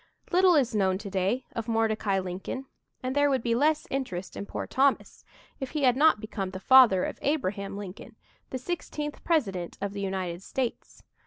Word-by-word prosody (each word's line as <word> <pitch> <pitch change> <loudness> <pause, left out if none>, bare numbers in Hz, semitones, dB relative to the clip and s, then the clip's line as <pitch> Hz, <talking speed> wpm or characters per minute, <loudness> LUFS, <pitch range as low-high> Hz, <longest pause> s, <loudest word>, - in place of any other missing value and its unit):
Little 365 -1 +5
is 255 -5 +2
known 190 -3 +2
today 200 +4 -1
of 230 0 -3
Mordecai 220 -3 +1
Lincoln, 190 +8 -4 0.4
and 255 +1 -2
there 285 0 +4
would 265 -4 0
be 235 - +1
less 300 +5 +2
interest 190 -10 -3
in 200 - -6
poor - - -4
Thomas 275 +1 +1 0.4
if 265 -2 -4
he 300 0 -2
had 250 -2 +5
not 300 -3 +5
become 210 -3 -4
the 185 0 -7
father 240 -5 +6
of - - -4
Abraham 200 -9 -1
Lincoln, 200 -2 -9 0.3
the 260 - -3
sixteenth 295 0 -5
President 195 - 0
of 200 +1 -3
the 200 - -4
United 190 -3 -3
States. 250 +4 -4
225 Hz, 175 wpm, -28 LUFS, 195-270 Hz, 0.4 s, father